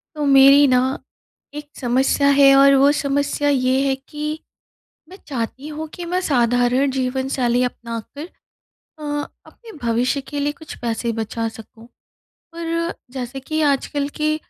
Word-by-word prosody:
तो 300 - -2
मेरी 275 +1 +7
ना 250 -1 +4 0.7
एक 295 0 -8
समस्या 265 +3 +1
है, 280 -1 +6
और 275 0 +6
वो 275 +1 +5
समस्या 285 0 0
ये 260 -1 +2
है 270 - +1
कि 300 +3 -6 0.7
मैं 370 - -12
चाहती 265 +2 -5
हूँ 310 +1 -6
कि 350 - -7
मैं 365 +1 0
साधारण 245 +1 +2
जीवनशैली 260 -1 -1
अपनाकर 240 +5 -6 0.7
अ, - - -9 0.4
अपने 460 -2 -15
भविष्य 240 +4 0
के 290 +2 -6
लिए 290 +1 0
कुछ 315 +1 -11
पैसे 235 0 -2
बचा 225 +1 -3
सकूँ। 225 +1 -14 0.7
पर 335 0 -2 0.2
जैसे 255 0 -6
कि 310 +4 -3
आजकल 280 +1 -1
की 305 0 +1
275 Hz, 140 wpm, -20 LUFS, 250-290 Hz, 0.7 s, मेरी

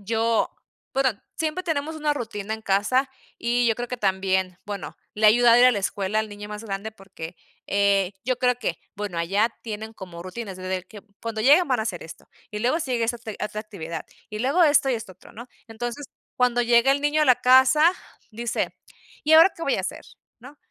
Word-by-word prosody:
...yo 225 +2 +1 0.5
bueno, 265 -1 +3 0.3
siempre 320 +3 -2
tenemos 315 -1 -2
una 300 -1 0
rutina 220 -4 -4
en 220 - -10
casa 215 +8 +1 0.3
y 240 +1 +1
yo 225 - +3
creo 245 +1 -5
que 250 - -4
también 190 -3 0
bueno, 200 -1 -6 0.2
le 215 +1 +3
ha - - +10
ayudado 240 +1 +6
ir 250 - +7
a 255 - +7
la 205 - -1
escuela 200 +2 -1
al 220 - -4
niño 205 0 -9
más 210 +1 -7
grande 205 +1 -5
porque 190 -4 -10 0.3
eh, 200 -1 +2
yo 255 -1 0
creo 250 -1 +3
que 225 - -2 0.2
bueno, 200 -4 -4
allá 200 +7 +2
tienen 220 0 -6
como 180 -5 -9
rutinas, 190 +1 -7
desde 185 0 -4
que 210 - -12 0.2
cuando 225 -1 -4
lleguen 295 +9 +6
van 255 -4 +1
a - - 0
hacer 190 -6 -4
esto 160 - -12 0.2
y 210 - -4
luego 250 +8 +1
sí 265 -6 -3
llega 235 -1 +1
esa 240 - -1
otr 225 -2 -8
otra 210 0 -5
actividad 170 -7 -7 0.2
y 210 - -5
luego 275 +10 +2
esto 290 -3 +4
y 260 - +2
esto 225 -3 -6
otro, - - -18
¿no? 235 +3 -10 0.2
Entonces 240 +5 -6 0.3
cuando 245 -1 +2
llega 235 +3 +4
el 280 - -1
niño 295 +1 +2
a - - +4
la 255 -3 +6
casa, 260 +6 +6 0.4
dice: 235 +1 -2 0.5
"¿Y 310 - +2
ahora 330 +4 +8
qué 330 - -8
voy 275 - +1
a - - -1
hacer?", 185 - -6 0.3
¿no? 255 +5 -13
225 Hz, 215 wpm, -24 LUFS, 200-255 Hz, 0.5 s, ha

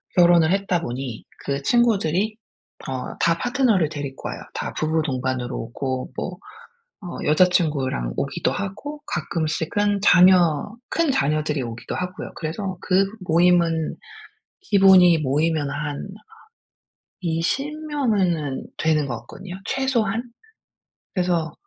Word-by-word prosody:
결혼을 175 -2 +5
했다 195 -3 0
보니 125 -4 -5 0.2
그 140 0 -1
친구들이 215 - +2 0.5
어 130 -1 -4
다 170 0 +3
파트너를 245 - +2
데리고 140 -3 -6
와요. - - -6 0.2
다 - - -4
부부동반으로 130 -5 -1
오고 130 +3 -4
뭐 180 -1 -4 0.7
어 175 - -6
여자친구랑 150 - +2
오기도 - - -1
하고 245 +10 -5
가끔씩은 170 +6 -1
자녀 180 -2 +5 0.2
큰 330 -4 +1
자녀들이 150 - 0
오기도 115 -1 -6
하고요. 180 0 -5
그래서 180 +4 -4
그 195 +1 +3 0.2
모임은 170 -2 +2 0.7
기본이 190 - +6
모이면 150 +1 0
한 145 +3 -4 1.1
20 270 - -2
명은 190 - 0
되는 155 -2 +1
것 120 - -3
같거든요 190 -1 -9
최소한. 235 -5 0 0.9
그래서 175 -4 0
170 Hz, 250 characters per minute, -23 LUFS, 150-195 Hz, 1.1 s, 기본이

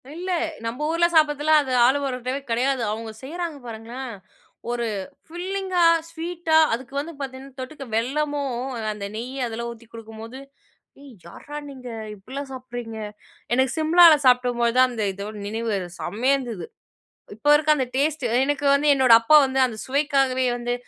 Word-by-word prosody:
இல்ல, 365 +2 -5 0.4
நம்ம 245 +6 -3
ஊர்ல 335 +1 +3
சாப்பிடதுலாம் 305 0 +4
அது 265 -2 -5
ஆலு 260 +3 +4
பரோட்டவே 255 +1 -3
கிடையாது! 250 +2 +1
அவங்க 220 +1 -5
செய்றாங்க 335 +1 -5
பாருங்களேன்! 235 +3 -7 0.6
ஒரு 240 -1 -1 0.4
ஃபில்லிங்கா 370 +1 -1 0.3
ஸ்வீட்டா, 330 -1 0 0.2
அதுக்கு 250 +2 -5
வந்து 320 +4 -5
பார்த்தீங்கன்னா 270 0 -8
தொட்டுக்க 275 +2 -7
வெல்லமும், 280 +1 -1 0.3
அந்த 205 -1 -6
நெய்ய 250 +2 -3
அதெல்லாம் 235 +1 -5
ஊத்தி 235 -1 -14
குடுக்கும்போது, 225 +2 -9 0.6
"ஏய், 280 -3 -13
யார்டா 295 +12 -9
நீங்க! 255 -3 -9 0.3
இப்படிலாம் 270 +7 -8
சாப்பிடுறீங்க?" 245 -3 -7 0.6
எனக்கு 260 0 +2
சிம்லாவில 325 0 +7
சாப்பிடும்போதுதான் 250 0 +3
அந்த 220 -3 -2
இதோட 200 +2 -7
நினைவு 220 -2 -2 0.2
செம்மையா 240 +9 +1
இருந்தது! 230 -10 -6 0.7
இப்போ 290 +7 +1
இருக்க 305 0 0
அந்த 260 - 0
டேஸ்ட்டு, 280 -3 0
எனக்கு 290 0 -1
வந்து 285 +2 +1
என்னோட 260 -3 +4
அப்பா 305 +7 +6
வந்து 265 0 -2
அந்த 230 -3 -7
சுவைக்காகவே 270 -2 +1
வந்து 245 0 -2
260 Hz, 140 wpm, -23 LUFS, 235-295 Hz, 0.7 s, சிம்லாவில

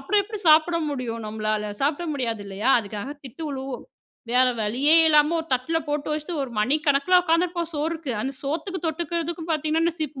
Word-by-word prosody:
அப்புறம் 405 +9 +2
எப்டி 425 +1 -7
சாப்ட 320 +2 +5
முடியும் 235 -5 -4
நம்பளால? 215 -1 -2
சாப்பிட 295 +5 0
முடியாது 230 -6 -2
இல்லையா! 200 +6 0
அதுக்காக 210 +6 -6
திட்டு 270 +5 -9
விழுவும். 265 -2 -5 0.5
வேற 255 +1 +5 0.2
வழியே 270 +10 +4
இல்லாமல 300 +2 +4
ஒரு 320 - -11
தட்ல 290 +6 -1
போட்டு 295 +1 -2
வச்சுட்டு 310 +2 -3
1 260 -3 -6
மணிக்கணக்கில 290 +7 +3
உக்காந்துருப்போம். 340 0 0
சோறுக்கு, 310 -2 -2
அந்த 270 +1 -3
சோத்துக்கு 340 +5 -3
தொட்டுக்கிறதுக்கு 335 +1 -3
பாத்தீங்கன்னானா 320 +2 0
சீப்பு 300 -3 -4
295 Hz, 160 wpm, -24 LUFS, 255-330 Hz, 0.5 s, சாப்ட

